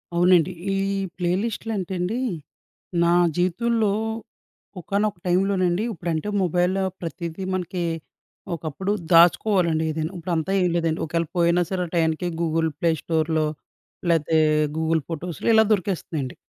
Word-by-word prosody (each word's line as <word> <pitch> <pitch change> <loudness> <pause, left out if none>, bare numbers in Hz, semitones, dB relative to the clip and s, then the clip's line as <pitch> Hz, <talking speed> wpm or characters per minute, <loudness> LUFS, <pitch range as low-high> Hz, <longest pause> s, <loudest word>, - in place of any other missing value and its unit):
అవునండి. 175 0 +4 0.2
ఈ - - 0 0.4
ప్లే 175 -1 0
లిస్ట్‌లంటే 215 -5 -3
అండి, 190 +7 -1 0.8
నా 170 0 +4 0.2
జీవితంలో 215 +4 +1 0.9
ఒకానొక 200 +2 -1
టైంలోనండి 185 +1 +2
ఇప్పుడంటే 170 -1 -3 0.2
మొబైల్‌లో 180 +2 +1 0.2
ప్రతీదీ 170 +1 -5
మనకి 180 -1 -3 0.7
ఒకప్పుడు 165 +5 -3 0.2
దాచుకోవాలండి 170 0 +4
ఏదైనా, 155 +1 -3
ఇప్పుడంతా 170 0 -2
ఏం 180 - +2
లేదండి, 165 -1 0
ఒకఏళ 165 +1 -1
పోయినా 170 +1 +3
సరే 185 -2 -1
ఆ - - -16
టయానికి 165 +1 +1
గూగుల్ 165 -1 +1
ప్లే 170 -1 +3
స్టోర్‌లో, 160 -1 0 0.7
లాతే 160 -1 +2 0.4
గూగుల్ 160 0 +1
ఫోటోస్‌లో 170 +4 -3
ఇలా 220 - +7
దొరికేస్తున్నాయండి. 170 -8 -3
175 Hz, 115 wpm, -23 LUFS, 160-185 Hz, 0.9 s, ఇలా